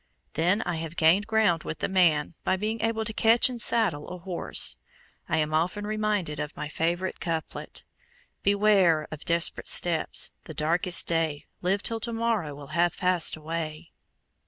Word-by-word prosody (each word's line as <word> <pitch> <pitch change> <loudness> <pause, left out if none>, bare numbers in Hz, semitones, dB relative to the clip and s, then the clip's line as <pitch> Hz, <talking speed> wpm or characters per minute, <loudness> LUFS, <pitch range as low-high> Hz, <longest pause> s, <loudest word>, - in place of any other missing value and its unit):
Then 180 +6 +1
I 175 -2 -3
have 165 0 -6
gained 170 +6 +3
ground 220 -7 +2
with - - -5
the - - -2
man 170 -6 +2
by 185 - +1
being 215 +3 -3
able 225 0 -1
to 220 - -3
catch 225 +4 +4
and 245 -2 -5
saddle 215 -14 +1
a 180 - -6
horse. 180 0 +1 0.5
I 160 - +1
am 155 0 0
often 180 +6 0
reminded 210 -7 -1
of 150 - -5
my 150 - -4
favorite 175 +4 -2
couplet, 165 -2 -5 0.6
Beware 200 -6 +3
of 155 - -8
desperate 170 0 +1
steps; 170 -2 +1
the 160 - -9
darkest 170 +5 +2
day, 160 -3 -1 0.2
Live 195 +3 0
till 225 -1 -1
to 235 +2 -3
morrow, 225 -10 -1
will 140 -1 -11
have 170 +1 +1
passed 180 -2 +3
away. 155 +1 -6
175 Hz, 165 wpm, -26 LUFS, 160-210 Hz, 0.6 s, catch